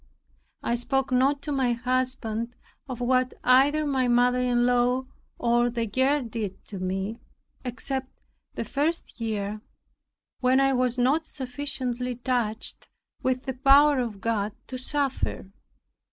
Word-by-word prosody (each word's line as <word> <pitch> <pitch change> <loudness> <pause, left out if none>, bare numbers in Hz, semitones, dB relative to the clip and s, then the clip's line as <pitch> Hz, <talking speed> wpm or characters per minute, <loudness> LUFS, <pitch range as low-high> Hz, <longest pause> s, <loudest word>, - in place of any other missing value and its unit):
I - - 0
spoke 265 +2 0
not 275 +3 +2
to 295 - -4
my 260 -3 +2
husband 245 -2 -1 0.3
of 250 -1 -5
what 255 +1 +2
either 280 +5 +4
my 265 -3 +1
mother 245 +1 +3
in 245 -1 +2
law 250 +1 +2 0.3
or 240 0 +2
the 230 -1 -2
girl 260 +6 +2
did 220 -4 -5
to 195 - -7
me, 190 +5 -3 0.4
except 260 +2 -3 0.5
the - - -3
first 295 -3 -2
year, 210 -1 -2 0.8
when 255 +1 +4
I 270 0 +3
was 250 -1 +1
not 270 +6 +3
sufficiently 250 -2 -3
touched 240 -3 -2 0.3
with 255 0 0
the 265 - -3
power 275 +2 +5
of 225 -5 -3
God 215 -2 -1
to 255 - -6
suffer. 270 -7 -2
250 Hz, 135 wpm, -26 LUFS, 235-265 Hz, 0.8 s, power